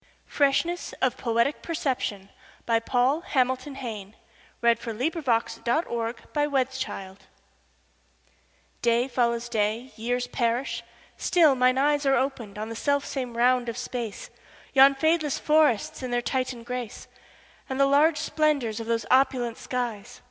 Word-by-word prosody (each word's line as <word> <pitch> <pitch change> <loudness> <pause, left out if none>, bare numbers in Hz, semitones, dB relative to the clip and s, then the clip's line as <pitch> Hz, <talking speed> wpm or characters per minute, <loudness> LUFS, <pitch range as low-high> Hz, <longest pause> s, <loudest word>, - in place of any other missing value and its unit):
Freshness 305 +5 0
of 260 -2 0
Poetic 235 +4 0
Perception 255 - -3 0.4
Paul 245 +5 +1
Hamilton 260 -2 -1
Hayne 220 -6 -7 0.5
(1830–1886) 235 - -1 1.6
DAY 235 +1 +2
follows 240 -2 0
day; 225 +2 -1
years 245 +2 -1
perish; 235 0 -1 0.4
still 325 -5 +4
mine 255 0 +3
eyesAre 285 -1 +3
opened 245 -7 -3
on 215 +1 -4
the 230 - -6
self 285 +3 0
same 250 -4 -4
round 245 0 +3
of 230 - -5
space; 240 -4 -5 0.4
Yon 275 +1 +7
fadeless 315 0 +1
forests 300 -8 +2
in 255 - -4
their 245 0 0
Titan 255 -2 -2
grace, 250 -2 -6 0.6
And 265 0 -3
the 275 - +6
large 295 +3 +4
splendors 285 -10 0
of 225 - -6
those 230 -2 0
opulent 255 -3 +2
skies. 240 -5 -4
250 Hz, 115 wpm, -26 LUFS, 230-275 Hz, 1.6 s, Yon